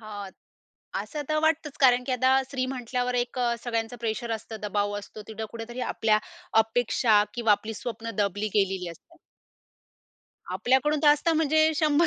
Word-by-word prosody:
हां, 205 -3 -7 0.7
असं 300 -2 -5
तर 310 0 +1
वाटतचं, 315 -2 0
कारण 250 -2 +5
की 260 - -2
आता 255 +1 +3
स्त्री 260 -1 -2
म्हटल्यावर 250 0 -2
एक 245 +1 -1
अ, 240 -1 +2
सगळ्यांचं 230 0 -2
प्रेशर 230 +1 -2
असतं, 225 0 -5
दबाव 205 0 -1
असतो. 205 +1 -10
तिथं 220 0 -5
कुठेतरी 235 +2 -7
आपल्या 215 -1 +3 0.5
अपेक्षा, 225 -1 +3
किंवा 230 -3 +3
आपली 220 +2 -1
स्वप्न 230 0 -5
दबली 205 +1 0
गेलेली 190 -3 +1
असते. 335 - -16 1.4
आपल्याकडून 265 +4 +2
तर 295 - +6
असतं 295 +3 +4
म्हणजे 315 0 +3
100, 310 +1 +3
240 Hz, 155 wpm, -27 LUFS, 215-270 Hz, 1.4 s, तर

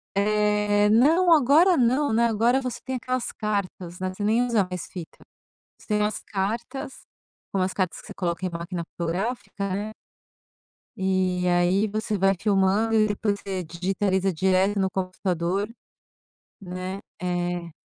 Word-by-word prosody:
É, 210 0 +2
não, 315 +11 +5
agora 320 +5 +6
não, 260 +3 +2
né. 230 +2 +3
Agora 230 +4 +2
você 250 -2 -4
tem 260 0 -3
aquelas 255 0 -2
cartas, 195 -4 -3
né, 185 0 -1
você 205 - -5
nem 225 +4 +3
usa 225 -6 +1
mais 180 -2 -5
fita. 175 -3 -9 0.6
Você - - -19
tem 210 -2 +2
umas 210 0 0
cartas, 230 +7 -3 0.6
são 195 - 0
umas 185 0 0
cartas 185 -3 -1
que - - -15
você - - -9
coloca 175 0 -2
em 185 - -1
máquina 170 +1 -4
fotográfica, 200 +3 -3
né 210 +2 -4 1.0
e 185 -1 +1
aí 180 +4 +3
você 215 0 -2
vai 195 +1 +3
filmando 205 +2 +2
e 215 -1 +4
depois 205 0 -1
você 190 -2 -4
digitaliza 190 +3 0
direto 190 +4 +2
no 190 -1 +2
computador, 185 +1 -1 0.9
né. 185 +1 -5 0.2
Eh 175 -1 -2
200 Hz, 150 wpm, -25 LUFS, 185-220 Hz, 1.0 s, agora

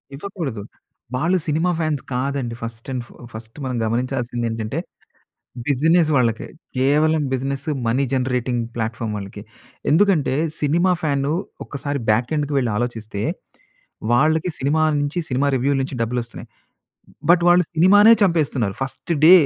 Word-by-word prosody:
ఇవ్వకూడదు. 150 - -5 0.5
వాళ్ళు 170 +8 +2
cinema 160 +4 +1
fans 155 -4 0
కాదండి. 130 -2 -2
ఫస్ట్ 115 +1 -7
ఎండ్ 125 -2 -3 0.3
ఫస్ట్ 110 0 -10
మనం 125 -2 -2
గమనించాల్సింది 120 0 -1
ఏంటంటే, 115 +6 -3 0.9
బిజినెస్ 155 +4 +3
వాళ్ళకి. 115 -4 +1 0.3
కేవలం 150 +4 +3
బిజినెస్, 135 +1 -2 0.2
మనీ 130 +5 +2
జనరేటింగ్ 125 -2 0
ప్లాట్‌ఫార్మ్ 115 -1 -3
వాళ్ళకి, 100 0 -7 0.5
ఎందుకంటే 165 -4 +3 0.3
సినిమా 170 +5 +2
ఫ్యాను 140 -1 0 0.3
ఒకసారి 140 0 -4
బ్యాక్ 120 +5 +2
ఎండ్‌కి 145 0 -1
‌వెళ్లి 125 -4 0
ఆలోచిస్తే 110 -3 -3 0.9
వాళ్లకి 155 +6 +3
సినిమా 145 +4 +1 0.2
నుంచి, 145 +4 -2
సినిమా 130 +2 +1
రివ్యూల 140 +3 +1
నుంచి 135 0 -5
డబ్బులు 120 +2 -1
వస్తున్నాయి. 115 - -10 0.8
బట్ 175 - +6
వాళ్ళు 175 +1 +6
సినిమానే 205 +7 +7
చంపేస్తున్నారు. 145 - +1
First 135 +6 -3
day 175 - +10
135 Hz, 125 wpm, -21 LUFS, 120-155 Hz, 0.9 s, day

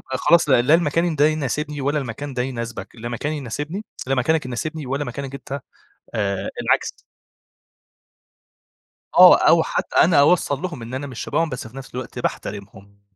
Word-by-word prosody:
طَب 130 - 0
خلاص 170 -1 +4
لأ، 120 -3 +5
لا 145 +6 +4
المكان 165 0 +1
ده 145 +2 +5
يناسبني، 150 -1 -2
ولا 145 +3 0
المكان 135 +2 -5
ده 125 - 0
يناسبك، 115 -3 -5
لا 120 +1 -6
مكاني 145 +6 -3
يناسبني 145 - -5 0.2
لا 135 - +1
مكانك 145 +2 +1
يناسبني 150 +4 -4
ولا 140 +3 -2
مكانك 135 +2 -6
أنت 140 +1 -6 0.6
آآ، 100 -3 -1
العكس. - - +1 2.2
آه - - +10
أو - - +6
حتّى - - -3
أنا 160 -3 +6
أوصَّل 145 -2 +3
لهم 165 -10 -5
إن 120 +3 -7
أنا 135 +2 -4
من 130 - -9
شَبههم، 165 +7 -1
بس 125 -5 -6
في 115 +4 -13
نَفْس 135 -2 -10
الوقت 125 -1 -6
باحترمهم. 100 0 -6
135 Hz, 170 wpm, -22 LUFS, 120-150 Hz, 2.2 s, آه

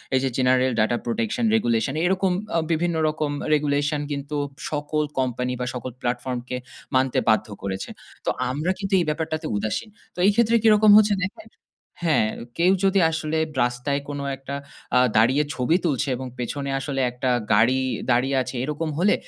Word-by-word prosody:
এই 130 - +4
যে 135 - +1
General 130 0 +3
Data 110 +2 +2
Protection 115 - -1
Regulation 120 - +1
এরকম 190 0 +2 0.3
অ - - +4
বিভিন্ন 170 +1 +1
রকম 155 -1 -2 0.2
regulation 145 0 +1
কিন্তু 140 +1 -4 0.4
সকল 150 +1 -1 0.2
কোম্পানি 125 0 -1
বা - - -1
সকল 125 +1 -5
প্লাটফর্মকে 125 0 -3 0.4
মানতে 130 0 +2
বাধ্য 110 - +3 0.2
করেছে। 95 -1 -4 0.4
তো - - +1 0.2
আমরা 150 +8 -1
কিন্তু 195 -1 -3
এই 170 - +1
ব্যাপারটাতে 155 0 -2
উদাসীন। 110 - -2 0.3
তো - - -9
এই 205 - +6
ক্ষেত্রে 235 0 +3
কিরকম 215 -1 +6
হচ্ছে 210 -1 +5
দেখেন 320 - -9 0.5
হ্যাঁ, 155 -10 +3 0.3
কেউ 180 +2 +4
যদি 195 0 +4
আসলে 160 0 -2 0.3
রাস্তায় 125 +4 -1
কোন 145 0 -4 0.2
একটা 135 +1 -6 0.4
আ - - +6 0.2
দাঁড়িয়ে 130 +7 +4
ছবি 130 +6 +1
তুলছে 145 -2 0
এবং 130 +1 -6
পেছনে 140 +3 -3
আসলে 135 -1 -2
একটা 125 +1 -2 0.2
গাড়ি 115 +5 +4 0.3
দাঁড়িয়ে 130 +3 +2
আছে 130 - -5
এরকম 150 +3 -2
হলে 200 +3 +4
140 Hz, 160 wpm, -24 LUFS, 125-160 Hz, 0.5 s, এই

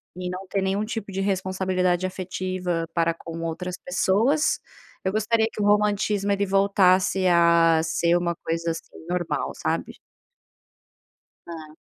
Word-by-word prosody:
e 180 0 -4
não 185 +1 -6
ter 195 +1 -1
nenhum 195 +2 0
tipo 215 -2 -5
de 190 - -4
responsabilidade 185 -2 0
afetiva 185 -2 -3
para 170 -1 +1
com 165 0 -9
outras 175 +2 -4
pessoas. 245 +13 +2 0.4
Eu 190 - 0
gostaria, 220 +2 +1
que - - -5
o - - +1
romantismo, 205 -1 +2
ele 200 0 +1
voltasse 190 -1 +3
a 170 -2 +5
ser 170 +1 +1
uma 175 -1 -1
coisa, 165 0 -3
assim, 165 0 -9
normal 175 -1 -2
sabe? - - -2 1.6
Ah. 155 -2 -9
185 Hz, 135 wpm, -24 LUFS, 170-200 Hz, 1.6 s, a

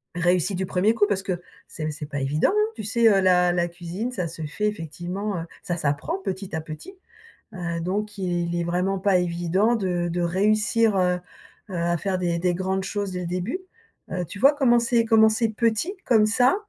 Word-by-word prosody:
réussi 180 +2 +1
du 190 +1 -1
1er 195 +5 +2
coup 205 -2 +3
parce 195 -1 0
que, 180 -3 -3 0.3
c'est 155 - -7
p 155 - -1
c'est 150 0 -7
pas 145 -2 -3
évident, 145 - +2
hein. 425 +1 +2
Tu - - -6
sais, 230 +2 +3
heu, 200 -2 +4
la 180 -1 +4
la 175 -1 +1
cuisine, 175 +7 -5
ça 180 -8 -2
se 160 0 -7
fait 180 +8 -2
effectivement 180 +2 -4
heu, - - -6 0.2
ça 175 - -2
s'apprend 145 +3 -1
petit 190 -2 -4
à 160 - -2
petit. 160 - -9 0.6
Heu, 170 -2 -3
donc 205 +4 -3
il 175 -2 -1
est - - -1
vraiment 180 +3 0
pas 195 -1 +3
évident 180 +6 +1
de 180 -4 -1
de 175 +1 -2
réussir, 210 +4 +2
heu 180 -1 +2 0.5
heu - - -6
à 170 0 +1
faire 190 +2 -1
des 175 -2 0
des 180 0 +2
grandes 190 +1 -1
choses 200 -1 -3
dès 180 - -3
le 180 - -4
début. 180 - -3 0.5
Heu, 180 -1 -1
tu 200 - -9
vois, 275 +3 +7
commencer 240 -4 +3
commencer 220 0 +4
petit 230 - 0
comme 220 -3 +4
ça 245 +4 +4
185 Hz, 205 wpm, -24 LUFS, 175-215 Hz, 0.6 s, vois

